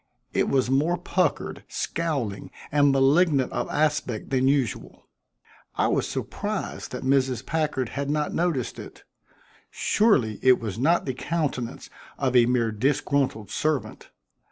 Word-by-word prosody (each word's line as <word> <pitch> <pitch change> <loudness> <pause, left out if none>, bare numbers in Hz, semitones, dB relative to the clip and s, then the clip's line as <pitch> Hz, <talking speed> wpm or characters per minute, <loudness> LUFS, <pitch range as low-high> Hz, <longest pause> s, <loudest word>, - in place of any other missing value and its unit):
It - - +1
was 130 -2 +2
more 150 +7 +2
puckered, 180 -4 -1
scowling 140 -12 -3 0.2
and 145 -1 +4
malignant 135 +1 +3
of - - -3
aspect 150 -8 -1
than 130 0 +2
usual. 135 -6 -1 0.7
I - - +2
was - - 0
surprised - - -4
that - - -5
Mrs. 130 -2 +1
Packard 150 -6 -1
had 140 0 -3
not 150 0 -1
noticed 165 -8 -1
it. - - -11 0.7
Surely 140 - +2
it 130 -1 +5
was 110 -2 -5
not 165 +7 +2
the 130 - -2
countenance 135 -4 -3 0.3
of 130 -2 0
a 120 -1 +6
mere 120 -2 +1
disgruntled 130 -2 0
servant. 155 -3 -2
135 Hz, 130 wpm, -25 LUFS, 125-150 Hz, 0.7 s, a